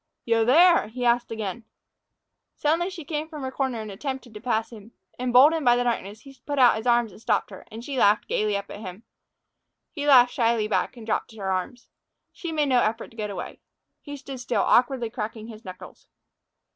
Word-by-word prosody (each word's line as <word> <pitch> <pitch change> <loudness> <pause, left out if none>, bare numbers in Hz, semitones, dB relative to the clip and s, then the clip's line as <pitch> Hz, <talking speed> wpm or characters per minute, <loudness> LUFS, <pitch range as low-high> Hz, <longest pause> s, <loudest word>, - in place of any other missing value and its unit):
"Yo 230 -1 +2
there?" 335 +5 +5
he 245 +3 -5
asked 240 0 +2
again. 220 0 -5 0.9
Suddenly 330 +4 0
she 350 -5 -9
came 305 +1 -3
from 300 -4 -8
her 260 - -3
corner 260 -4 -2
and 215 -1 -7
attempted 260 +2 -6
to 210 - -9
pass 225 -2 -1
him. 220 0 -13 0.3
Emboldened 260 +6 +5
by 240 -2 +5
the 245 - +1
darkness, 220 -3 -3
he 275 -1 -14
put 290 -1 -2
out 250 -3 +6
his 220 +3 -5
arms 240 -2 +3
and 210 - -15
stopped - - 0
her, 190 - -12
and 225 +2 -9
she 275 -3 -3
laughed 205 0 +3
gaily 210 -1 0
up 200 0 -8
at - - -8
him. 190 +1 -9 0.9
He 290 -3 -4
laughed 250 -3 +6
shyly 230 -2 +1
back 245 - -1
and 230 - -10
dropped 225 +1 -2
her 195 -3 -3
arms. 190 +7 -4 0.5
She 340 - -6
made 300 -3 0
no 250 -2 +4
effort 220 +1 -2
to - - -19
get 210 -2 -4
away. 200 - -7 0.4
He 290 -1 -8
stood 270 -1 -9
still, 245 0 0
awkwardly 245 -2 +2
cracking 220 +1 -6
his 220 0 -11
knuckles. 185 -1 -11
240 Hz, 205 wpm, -25 LUFS, 220-270 Hz, 0.9 s, out